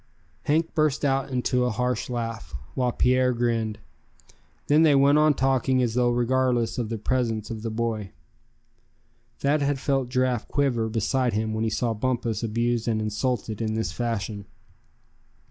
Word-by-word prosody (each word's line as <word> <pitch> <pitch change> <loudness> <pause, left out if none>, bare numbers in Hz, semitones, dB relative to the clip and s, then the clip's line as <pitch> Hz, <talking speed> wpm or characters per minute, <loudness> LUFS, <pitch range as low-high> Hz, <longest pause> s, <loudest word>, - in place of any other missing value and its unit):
Hank 160 +3 +1
burst 155 -2 +1
out 135 0 +1
into 125 -1 0
a 125 - +1
harsh 125 +3 -1
laugh, 115 -8 -4 0.2
while 125 -1 0
Pierre 125 +1 +2
grinned. 115 -3 -1 0.9
Then 150 +2 +4
they 155 -3 +5
went 140 +2 +5
on 155 -1 +4
talking 130 -1 +2
as 115 -2 0
though 125 0 +2
regardless 120 -1 +1
of 115 -3 -2
the 115 - -3
presence 115 -1 -1
of 110 -1 -5
the 115 - -3
boy. 110 -2 -2 1.3
Thad 145 +2 +1
had 140 0 +1
felt 135 -1 -1
Giraffe 125 -2 0
quiver 125 -6 0
beside 120 +3 0
him 110 +1 -1
when 110 0 -1
he 115 - +1
saw 115 +2 0
Bumpus 115 -1 -1
abused 115 +1 -1
and 110 -2 +1
insulted 110 +1 -2
in 110 -1 -1
this 110 -7 -1
fashion. 105 -1 -3
120 Hz, 160 wpm, -25 LUFS, 110-130 Hz, 1.3 s, they